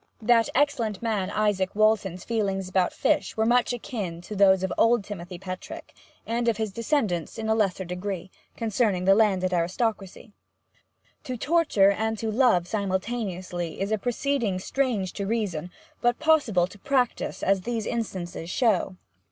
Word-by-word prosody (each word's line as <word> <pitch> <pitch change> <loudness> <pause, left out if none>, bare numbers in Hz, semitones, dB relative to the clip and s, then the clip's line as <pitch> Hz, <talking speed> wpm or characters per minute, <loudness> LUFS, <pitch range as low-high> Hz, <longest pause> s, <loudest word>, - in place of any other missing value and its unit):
That 230 0 +4
excellent 245 -8 +1
man 210 -5 -1
Izaak 205 -3 0
Walton's 205 -4 +2
feelings 195 -5 -1
about 185 -1 +1
fish - - 0
were 220 - +2
much 245 +2 +3
akin 210 -8 -4
to 210 +4 -8
those 190 -1 +5
of 190 - -1
old 230 -2 +3
Timothy 180 -3 -7
Petrick, 185 0 -8 0.3
and 235 +1 -1
of 230 -3 +2
his 220 -2 -2
descendants 215 - -1
in 220 -1 -3
a 220 - +3
lesser 195 -4 0
degree, 180 +1 -5 0.3
concerning 215 -5 0
the 195 - +6
landed 190 -3 +2
aristocracy. 195 +4 -2 0.9
To 255 -3 -4
torture 280 -9 +3
and 220 +2 -1
to 220 0 -2
love 220 -7 +3
simultaneously 190 -4 -3
is 195 +2 -2
a 215 - +1
proceeding 245 -3 -1
strange 210 -2 -1
to 200 -1 -4
reason, 195 -7 -2 0.3
but 240 0 +2
possible 295 - +3
to 200 +3 -13
practice, 255 0 -1
as 195 -1 +2
these 225 +1 -3
instances 185 -7 -4
show. 195 -4 +1
205 Hz, 150 wpm, -26 LUFS, 185-230 Hz, 0.9 s, the